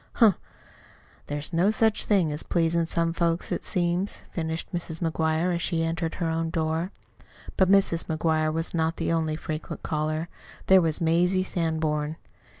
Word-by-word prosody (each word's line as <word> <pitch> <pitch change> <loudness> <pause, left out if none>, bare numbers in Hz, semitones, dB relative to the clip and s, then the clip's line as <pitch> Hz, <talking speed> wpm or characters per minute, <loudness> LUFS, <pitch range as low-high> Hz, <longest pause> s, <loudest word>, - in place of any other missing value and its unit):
Humph! 220 -7 +5 0.9
There's 145 +3 -4
no 175 +4 +3
such 220 0 +2
thing 185 -7 +2
as 150 +1 -4
pleasin' 170 -1 +1
some 165 0 0
folks, 170 0 0
it - - -2
seems!" 175 +2 -1
finished 160 0 -4
Mrs. 170 -2 -4
McGuire 160 +1 0
as 170 - -1
she 165 -1 0
entered 165 0 -2
her 170 - -2
own 165 0 -1
door. 160 +2 -1 0.6
But 190 -1 +3
Mrs. 195 -4 +3
McGuire 155 -1 +1
was 165 +1 -2
not 160 0 0
the - - -1
only 160 -2 0
frequent 155 0 -6
caller. 155 +1 -1 0.4
There 190 -1 +6
was 160 -1 0
Mazie 175 +3 +3
Sanborn. 160 -4 -1
165 Hz, 155 wpm, -26 LUFS, 160-175 Hz, 0.9 s, There